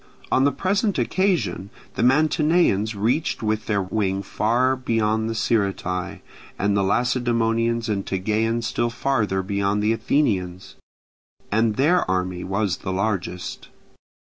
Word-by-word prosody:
On 130 - +3
the 140 - +4
present 200 +4 0
occasion 130 - 0 0.2
the - - -3
Mantineans 150 - +2
reached 115 +8 0
with 110 0 -1
their 100 -3 +1
wing 95 0 -1
far 125 +6 +1
beyond 110 -3 0
the 115 - -3
Sciritae, 95 -5 -1 0.4
and 100 +1 +1
the 100 - +2
Lacedaemonians 115 +1 +1
and 100 -3 -1
Tegeans 110 +4 -1
still 120 +1 0
farther 115 -6 0
beyond 100 +1 0
the 110 +1 +3
Athenians, 95 -9 -1 0.8
as 110 +1 +2
their 150 - +2
army 90 -1 -1
was 95 -1 -1
the 95 - -5
largest. 95 -2 -3
110 Hz, 125 wpm, -23 LUFS, 100-120 Hz, 0.8 s, the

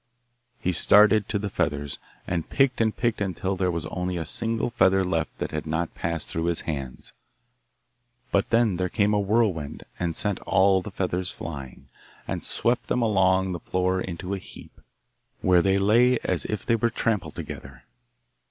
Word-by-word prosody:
He 90 - 0
started 105 +3 +5
to 105 - +1
the 100 -1 -4
feathers, 75 -5 -2 0.3
and 85 -3 -3
picked 135 -3 +2
and 110 -1 +1
picked 115 -3 0
until 95 0 -1
there 90 0 0
was 85 -3 -2
only 90 0 -3
a 80 - -3
single 115 +8 -2
feather 95 -4 +3
left 85 -3 -2
that - - -4
had 75 0 -4
not 80 +2 -2
passed 85 -2 -3
through 80 0 -2
his 85 -1 0
hands. 70 -5 -6 1.2
But 100 - +1
then 115 -5 +3
there 90 0 -1
came 105 0 +2
a 105 - +3
whirlwind 100 -7 0 0.2
and 85 -2 -1
sent 105 -2 +1
all 95 0 +3
the 100 - -7
feathers 90 -2 -2
flying, 70 -5 -8 0.4
and - - -3
swept 120 -2 0
them 125 - +1
along 95 -3 +3
the 85 - -4
floor 95 +2 0
into 90 +1 -5
a 100 - -2
heap, - - -14 0.6
where 90 -1 +5
they 95 +2 +2
lay 120 +6 +4
as - - -1
if 105 - -4
they 115 - +3
were 115 +1 +1
trampled 115 -3 -1
together. 65 -2 -8
95 Hz, 175 wpm, -25 LUFS, 85-105 Hz, 1.2 s, started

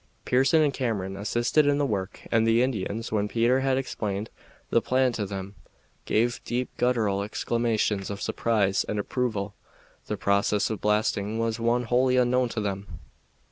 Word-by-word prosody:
Pearson 135 +5 +4
and 145 -2 +1
Cameron 100 -7 -2
assisted 120 +8 +1
in 145 0 +3
the 145 - +1
work, 100 -6 -3
and 115 -1 +3
the 115 +2 +4
Indians, 115 -2 -2
when 105 -1 +1
Peter 120 +4 +2
had 135 -1 +1
explained 105 -5 -3 0.4
the 115 - +4
plan 130 +1 +2
to 110 -4 -3
them, 95 0 -6 0.5
gave 120 +2 +1
deep 125 +2 -3
gutteral 110 -6 +1
exclamations 110 -2 -1
of 100 -1 -5
surprise 100 -3 +1
and 105 - -4
approval. 105 -2 -2 0.5
The - - -2
process 100 +1 +1
of 110 - -4
blasting 105 0 0
was 115 0 -1
one 120 +1 +1
wholly 125 +2 +2
unknown 125 0 +2
to 115 - -3
them. 100 -1 -3
115 Hz, 160 wpm, -26 LUFS, 100-125 Hz, 0.5 s, Pearson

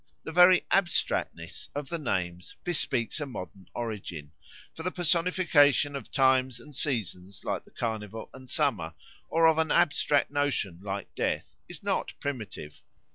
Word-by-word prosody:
The - - -5
very 180 +2 +7
abstractness 175 - 0
of 145 -1 -4
the 170 - -2
names 90 - -2
bespeaks 145 -8 0
a 145 - -3
modern 95 - -8
origin; 95 -10 -5 0.4
for - - -8
the 180 - -1
personification 165 -5 +3
of 140 - -7
times 130 -2 +3
and 150 -2 -13
seasons 100 - -2
like - - -2
the - - -18
Carnival 110 -1 -4
and 130 -1 -12
Summer, 110 - 0 0.3
or 165 0 +4
of 160 -1 +5
an 160 -1 +2
abstract 145 -4 +3
notion 145 - 0
like 100 0 -5
death, - - -1 0.2
is - - -9
not - - -1
primitive. 110 - -6
130 Hz, 145 wpm, -29 LUFS, 100-155 Hz, 0.4 s, very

